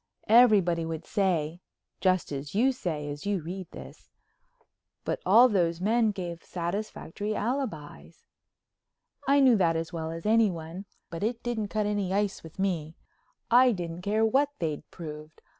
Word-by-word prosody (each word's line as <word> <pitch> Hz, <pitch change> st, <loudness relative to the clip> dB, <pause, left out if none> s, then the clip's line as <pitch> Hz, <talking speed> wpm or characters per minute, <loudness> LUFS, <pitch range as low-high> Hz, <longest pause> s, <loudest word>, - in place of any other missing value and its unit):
Everybody 205 Hz, -8 st, +5 dB
would 160 Hz, 0 st, -5 dB
say—just 185 Hz, 0 st, -1 dB
as 140 Hz, +4 st, -5 dB
you 250 Hz, +6 st, +4 dB
say 160 Hz, -, -4 dB
as 145 Hz, +6 st, -6 dB
you 205 Hz, -2 st, +1 dB
read 180 Hz, +2 st, -6 dB
this—"but -, -, -11 dB
all 245 Hz, +3 st, +8 dB
those 175 Hz, -7 st, +1 dB
men 220 Hz, +4 st, +2 dB
gave 175 Hz, -4 st, -5 dB
satisfactory 200 Hz, +3 st, -4 dB
alibis." 160 Hz, -, -4 dB, 1.0 s
I 280 Hz, +1 st, +5 dB
knew 260 Hz, -3 st, +6 dB
that 170 Hz, -4 st, +2 dB
as 165 Hz, +2 st, -3 dB
well 160 Hz, -1 st, -3 dB
as 165 Hz, +3 st, -7 dB
anyone, 195 Hz, -5 st, +1 dB, 0.3 s
but 165 Hz, -, -6 dB
it 230 Hz, +3 st, -2 dB
didn't 230 Hz, -3 st, -2 dB
cut 215 Hz, +1 st, -1 dB
any 205 Hz, -3 st, -1 dB
ice 200 Hz, 0 st, 0 dB
with 160 Hz, -1 st, -13 dB
me, 170 Hz, -5 st, -2 dB, 0.6 s
I 250 Hz, +1 st, +6 dB
didn't 175 Hz, -2 st, -5 dB
care 215 Hz, +3 st, +1 dB
what 275 Hz, +6 st, +3 dB
they'd 155 Hz, -4 st, -4 dB
proved. 155 Hz, -2 st, -9 dB
190 Hz, 140 wpm, -28 LUFS, 165-220 Hz, 1.0 s, all